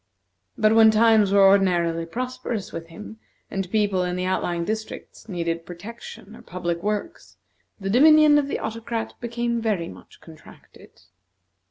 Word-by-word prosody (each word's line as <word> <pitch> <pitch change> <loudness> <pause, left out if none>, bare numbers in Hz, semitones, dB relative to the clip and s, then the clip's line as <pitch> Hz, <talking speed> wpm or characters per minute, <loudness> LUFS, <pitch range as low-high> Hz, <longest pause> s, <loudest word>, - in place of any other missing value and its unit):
But 215 0 +3
when 225 0 +7
times 220 -2 +4
were 200 -1 +6
ordinarily 175 -4 +2
prosperous 245 -1 -5
with 165 0 -7
him, 215 +6 -11 0.3
and 195 -2 -3
people 205 -3 +1
in 180 0 -2
the 180 0 -3
outlying 175 -2 -1
districts 220 +1 -7
needed 170 -2 -3
protection 205 +3 -11
or - - -14
public 170 -1 -4
works, 210 - -5 0.4
the 195 - -5
dominion 305 +4 +6
of 280 - -2
the - - -3
Autocrat 225 +1 -5
became 235 0 -2
very 200 -7 -1
much - - -15
contracted. 160 -2 -17
210 Hz, 145 wpm, -23 LUFS, 180-230 Hz, 0.4 s, when